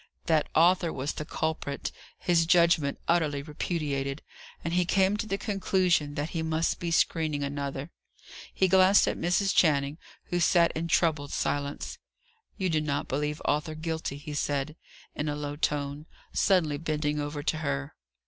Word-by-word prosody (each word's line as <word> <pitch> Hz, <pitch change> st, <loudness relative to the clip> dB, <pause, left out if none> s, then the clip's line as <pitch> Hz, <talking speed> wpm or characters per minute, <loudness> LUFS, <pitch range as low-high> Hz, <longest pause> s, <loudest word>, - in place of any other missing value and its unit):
That 160 Hz, -2 st, +2 dB
Arthur 170 Hz, +1 st, +4 dB
was 140 Hz, +1 st, -3 dB
the 150 Hz, -, -5 dB
culprit, 155 Hz, -3 st, -3 dB, 0.3 s
his 170 Hz, -2 st, +2 dB
judgment 170 Hz, -5 st, +4 dB
utterly 155 Hz, -5 st, +1 dB
repudiated; 145 Hz, -2 st, -3 dB, 0.4 s
and 165 Hz, -, -2 dB
he 180 Hz, 0 st, +3 dB
came 190 Hz, +2 st, +2 dB
to 215 Hz, -, -3 dB
the 195 Hz, -, -1 dB
conclusion 185 Hz, -8 st, +1 dB
that 150 Hz, +2 st, -3 dB
he 165 Hz, -, -2 dB
must 160 Hz, 0 st, 0 dB
be 170 Hz, -, -2 dB
screening 155 Hz, -3 st, +1 dB
another. 140 Hz, +1 st, -4 dB, 0.6 s
He 190 Hz, -, +2 dB
glanced 190 Hz, +2 st, +5 dB
at -, -, 0 dB
Mrs. 180 Hz, +3 st, +1 dB
Channing, 145 Hz, -2 st, +3 dB, 0.3 s
who 175 Hz, -, +1 dB
sat 170 Hz, 0 st, +4 dB
in 165 Hz, +2 st, -3 dB
troubled 160 Hz, -4 st, +1 dB
silence. 145 Hz, 0 st, -2 dB, 0.6 s
"You 190 Hz, -3 st, 0 dB
do 160 Hz, -3 st, +1 dB
not 145 Hz, -2 st, -2 dB
believe 150 Hz, +2 st, -2 dB
Arthur 150 Hz, +1 st, 0 dB
guilty?" 160 Hz, -3 st, -3 dB
he 150 Hz, +1 st, -7 dB
said, 145 Hz, +1 st, -1 dB, 0.4 s
in 150 Hz, +1 st, -2 dB
a 145 Hz, -, -2 dB
low 145 Hz, 0 st, -4 dB
tone, 145 Hz, 0 st, -2 dB, 0.3 s
suddenly 160 Hz, -7 st, +2 dB
bending 150 Hz, -1 st, -1 dB
over 145 Hz, 0 st, -4 dB
to 155 Hz, +1 st, 0 dB
her. 140 Hz, 0 st, -3 dB
155 Hz, 160 wpm, -28 LUFS, 145-170 Hz, 0.6 s, glanced